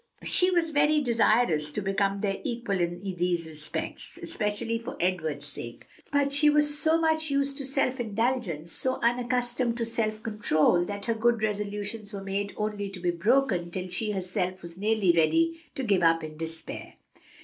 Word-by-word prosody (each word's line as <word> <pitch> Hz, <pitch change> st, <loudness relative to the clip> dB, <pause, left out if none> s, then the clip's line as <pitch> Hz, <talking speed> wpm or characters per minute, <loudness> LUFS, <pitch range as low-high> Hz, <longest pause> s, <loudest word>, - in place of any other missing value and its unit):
She 365 Hz, -, +2 dB
was 340 Hz, -3 st, +1 dB
very 295 Hz, +1 st, +4 dB
desirous 225 Hz, -, +2 dB
to -, -, -2 dB
become 195 Hz, 0 st, 0 dB
their 195 Hz, -2 st, 0 dB
equal 235 Hz, -5 st, -2 dB
in 175 Hz, 0 st, -1 dB
these 180 Hz, -3 st, -1 dB
respects, 155 Hz, -1 st, -6 dB
especially 215 Hz, +1 st, -2 dB
for 235 Hz, +3 st, -7 dB
Edward's 160 Hz, -5 st, -1 dB
sake, 120 Hz, -5 st, -9 dB, 0.3 s
but 285 Hz, -1 st, +2 dB
she 295 Hz, +1 st, +4 dB
was 295 Hz, 0 st, +3 dB
so 315 Hz, +2 st, +3 dB
much 315 Hz, -1 st, +1 dB
used 280 Hz, 0 st, +1 dB
to 275 Hz, -, -4 dB
self 270 Hz, -1 st, 0 dB
indulgence, 220 Hz, -8 st, -1 dB
so 260 Hz, +7 st, -1 dB
unaccustomed 245 Hz, 0 st, +1 dB
to 230 Hz, -, -1 dB
self 220 Hz, -1 st, -1 dB
control, 180 Hz, -6 st, +2 dB
that 200 Hz, +1 st, -4 dB
her 230 Hz, -, +1 dB
good 230 Hz, 0 st, +2 dB
resolutions 210 Hz, 0 st, -3 dB
were 195 Hz, -1 st, -5 dB
made 200 Hz, +1 st, -2 dB
only 210 Hz, -1 st, -2 dB
to 195 Hz, -1 st, -8 dB
be 175 Hz, 0 st, +1 dB
broken 190 Hz, -1 st, +2 dB
till 185 Hz, +1 st, -4 dB
she 215 Hz, +4 st, -2 dB
herself 185 Hz, -1 st, -2 dB
was 170 Hz, -1 st, -8 dB
nearly 205 Hz, -1 st, +2 dB
ready 330 Hz, -, +2 dB
to 270 Hz, -, -3 dB
give 200 Hz, -6 st, +2 dB
up 165 Hz, -1 st, +4 dB
in 155 Hz, 0 st, -7 dB
despair. 165 Hz, +1 st, -5 dB
210 Hz, 170 wpm, -28 LUFS, 180-250 Hz, 0.3 s, very